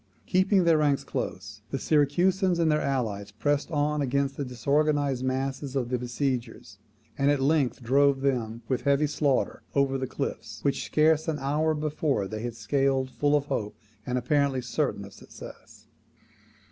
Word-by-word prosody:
Keeping 190 +1 +3
their 165 -2 +4
ranks 145 -2 +2
close, 105 0 -5
the 135 - -2
Syracusans 175 +7 +2
and 165 -2 +2
their 150 0 +2
allies 110 -7 -2
pressed 145 +8 -1
on 150 -1 0
against 140 +1 0
the 145 - -3
disorganized 140 +1 0
masses 135 +1 -2
of 125 -3 -1
the 125 -1 -1
besiegers; 125 -5 -3 0.4
and 140 +1 +3
at 145 -1 +2
length 135 -3 +1
drove 135 +2 +3
them, 120 -4 -1
with 130 - -1
heavy 140 +1 +2
slaughter, 145 -2 0
over 135 -1 +2
the 130 - -2
cliffs, 110 -5 -5
which, 140 -1 0
scarce 155 +1 +2
an 160 -2 -1
hour 150 +3 0
before, 150 -7 -1
they 110 +2 -5
had 120 -1 -4
scaled 130 +3 0
full 145 +2 +1
of 145 -1 +1
hope, 115 -8 -3 0.3
and 125 +2 -2
apparently 140 +1 +1
certain 120 -4 -2
of 100 - -13
success. - - -13
140 Hz, 160 wpm, -27 LUFS, 125-150 Hz, 0.4 s, their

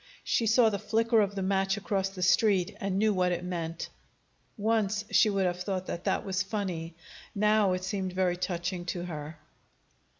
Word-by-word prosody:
She 230 - +1
saw 225 0 +5
the 200 - -2
flicker 225 +1 +2
of 200 -1 -1
the 195 - -2
match 195 +1 +1
across 195 -1 -1
the 190 -2 -5
street, 190 -1 +3
and 195 -1 -1
knew 215 +1 +3
what 180 -1 +1
it 175 - -2
meant. 170 -2 -4 0.7
Once 215 -1 0
she 215 - +5
would 195 -2 +1
have 180 0 -1
thought 185 -1 -2
that 170 - -5
that - - 0
was 190 -2 -1
funny; 185 -5 -3 0.4
now 210 -1 +3
it 185 0 -3
seemed 190 -1 -3
very 185 -1 +1
touching 180 0 -3
to 175 0 -3
her. 155 -2 -7
190 Hz, 185 wpm, -29 LUFS, 180-210 Hz, 0.7 s, saw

